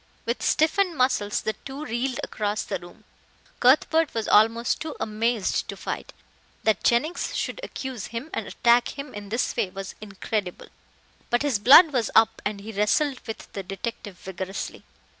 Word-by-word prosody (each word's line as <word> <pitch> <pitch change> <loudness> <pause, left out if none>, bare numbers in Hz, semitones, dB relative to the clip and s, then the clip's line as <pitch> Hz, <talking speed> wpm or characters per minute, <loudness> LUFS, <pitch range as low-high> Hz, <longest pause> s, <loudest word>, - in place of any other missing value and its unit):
With 235 +2 -2
stiffened 340 +2 +2
muscles 250 -5 +1
the 220 - -1
two 275 +3 -7
reeled 250 +1 -2
across 210 0 -2
the - - -4
room. 175 +5 -14 0.6
Cuthbert 310 +4 +4
was 225 -1 -1
almost 230 +3 +3
too 315 -1 -5
amazed 220 -1 0
to - - -6
fight. - - -5 0.5
That 220 -3 +2
Jennings 295 +9 +1
should - - -3
accuse 265 - -6
him 235 +8 -6
and 220 - -3
attack 240 +3 +2
him 280 -1 -7
in 205 -1 -8
this 230 +4 -1
way 225 -6 0
was 195 +1 -7
incredible. 200 -2 -4 0.6
But 240 +3 +2
his 275 -8 +1
blood 290 - +8
was 240 -4 +1
up 225 0 +4
and 205 -1 -3
he 220 +2 -7
wrestled 240 +7 +1
with 220 - -8
the 200 - -4
detective 195 +1 -6
vigorously. 190 +1 -6
230 Hz, 160 wpm, -25 LUFS, 205-265 Hz, 0.6 s, blood